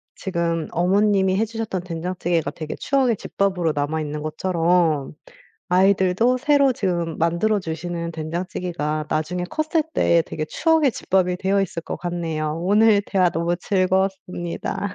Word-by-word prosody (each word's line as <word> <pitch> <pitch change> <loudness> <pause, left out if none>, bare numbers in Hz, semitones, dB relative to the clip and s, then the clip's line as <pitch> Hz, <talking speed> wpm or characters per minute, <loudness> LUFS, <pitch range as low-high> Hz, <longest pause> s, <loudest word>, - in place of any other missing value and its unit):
지금 170 -3 -2
어머님이 190 +2 +2
해 220 - +2
주셨던 220 -5 -4
된장찌개가 170 -2 -2
되게 155 0 -6
추억의 260 -6 +1
집밥으로 180 -5 -1
남아있는 150 +1 -2
것처럼 165 -2 +1 0.6
아이들도 190 +6 +3
새로 280 0 +3
지금 175 -6 -2
만들어 170 +6 +1
주시는 170 0 -4
된장찌개가 160 -1 -3
나중에 175 +3 -1
컸을 310 - 0
때 170 -1 +3
되게 155 0 -4
추억의 320 - +2
집밥이 180 -2 0
되어 195 +2 +1
있을 170 -3 -3
것 - - -5
같네요. 160 -3 -3
오늘 210 +2 +4
대화 185 -3 +2
너무 170 +1 -1
즐거웠습니다. 190 0 -1
180 Hz, 335 characters per minute, -22 LUFS, 165-200 Hz, 0.6 s, 오늘